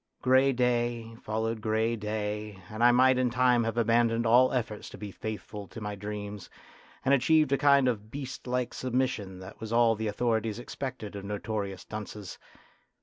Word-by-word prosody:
Grey 130 +1 +5
day 120 -2 0
followed 110 +1 -2
grey 110 +2 +1
day, 105 -1 -4
and 110 +2 -2
I 120 - +8
might 130 +1 +5
in 125 -1 +2
time 125 -1 +3
have 115 0 -2
abandoned 115 0 +3
all 125 +3 +5
efforts 110 -4 -3
to - - -10
be 105 -2 -7
faithful 105 -1 -6
to - - -9
my 105 -1 -4
dreams, 105 -1 -6 0.6
and 135 - +4
achieved 150 +2 +4
a 140 - +4
kind 140 -2 +5
of 110 -3 -2
beast 135 0 -7
like 125 0 -1
submission 125 -7 -1
that 95 +2 -11
was 110 0 -6
all 115 -1 +4
the 110 0 -3
authorities 110 0 0
expected 120 -4 -6
of 100 - -6
notorious 100 -1 -4
dunces. 105 -2 -7
115 Hz, 170 wpm, -29 LUFS, 105-125 Hz, 0.6 s, I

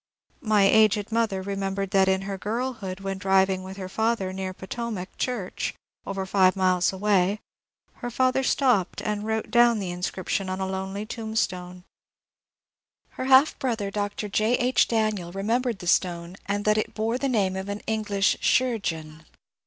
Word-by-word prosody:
My 215 -3 +3
aged 215 0 +4
mother 220 -4 0
remembered 195 0 -3
that 195 -1 +4
in 190 0 +1
her 195 0 -4
girlhood 210 -2 -4
when 195 -1 -4
driving 190 -1 +2
with 190 +1 -9
her 190 -1 -5
father 220 -1 -1
near 190 0 -4
Potomac 190 0 -6
church, 230 -8 -2 0.3
over 195 -1 -3
five 190 -1 +3
miles 185 -2 +2
away, 195 0 +1 0.6
her 245 - -5
father 255 +2 +2
stopped 250 -8 +1
and 210 0 -2
wrote 220 0 -2
down 240 -1 +5
the 190 -4 -3
inscription 185 +2 -3
on 185 0 -3
a 190 - -1
lonely 190 +2 -4
tombstone; 185 -6 -3 1.3
her 255 - -6
half 265 +3 +5
brother, 225 -6 -2
Dr. 205 +1 -3
J. 215 +4 +2
H. 250 +1 +2
Daniel, 215 -6 0
remembered 225 +5 -1
the 180 - -9
stone 170 0 0
and 205 +1 -1
that 215 0 +3
it - - -4
bore 225 +3 -1
the 275 - 0
name 195 -6 +1
of 190 +1 -5
an 205 +1 -4
English 210 -2 0
'« - - -27
chirurgeon." 165 -11 0
200 Hz, 160 wpm, -25 LUFS, 190-220 Hz, 1.3 s, down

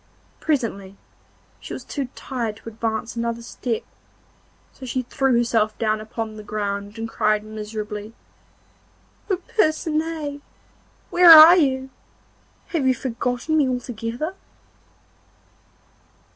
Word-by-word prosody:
Presently 210 -10 -2 0.6
she - - -8
was - - -7
too 280 -3 -4
tired 235 -5 -4
to 225 - -9
advance 225 +1 -3
another 235 0 -3
step, 230 0 -4 0.9
so - - -15
she 255 0 -2
threw 260 0 +1
herself 225 -2 +1
down 215 -2 0
upon 220 0 -6
the 215 - -9
ground 205 0 -4
and 225 0 -4
cried 215 -1 +1
miserably: 215 0 -6 1.1
'Oh, 380 - +1
Percinet! 310 -4 -1 0.7
where 350 -1 +7
are 320 +2 +12
you? 265 -5 +1 0.8
Have 300 -6 0
you 260 - +3
forgotten 250 +4 -2
me 290 -4 +3
altogether? 245 - -4
235 Hz, 110 wpm, -22 LUFS, 215-280 Hz, 1.1 s, are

